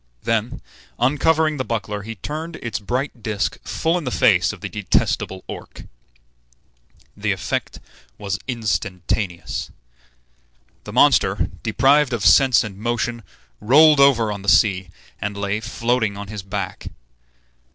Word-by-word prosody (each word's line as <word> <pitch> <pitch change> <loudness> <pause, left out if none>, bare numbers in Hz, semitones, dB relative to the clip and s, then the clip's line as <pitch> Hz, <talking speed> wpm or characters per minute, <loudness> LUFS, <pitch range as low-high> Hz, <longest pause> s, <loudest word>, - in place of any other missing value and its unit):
Then, 115 +1 -1 0.3
uncovering 150 +4 +2
the 130 - -1
buckler, 105 -3 -3
he 115 +2 -7
turned 155 - -6
its 120 -6 -4
bright 125 +4 -3
disk 105 -1 -2
full 165 +2 0
in - - -8
the 130 - -2
face 105 -8 +3
of 105 -4 -11
the - - -4
detestable 95 -2 -1
Orc. - - -9 1.3
The - - -1
effect - - -3 0.4
was 100 -1 -3
instantaneous. 100 -5 -3 1.2
The - - -7
monster, - - +3
deprived 135 +4 +3
of 115 -4 -2
sense 130 -3 +6
and 100 -3 -8
motion, 120 +1 -2 0.4
rolled 150 +6 +6
over 120 -6 +4
on 100 -1 -5
the 100 - 0
sea, 95 -5 +3 0.3
and 105 0 -3
lay 100 +1 -1
floating 115 -1 -1
on 100 0 -7
his 105 -2 -6
back. 95 0 -5
115 Hz, 130 wpm, -21 LUFS, 100-130 Hz, 1.3 s, sense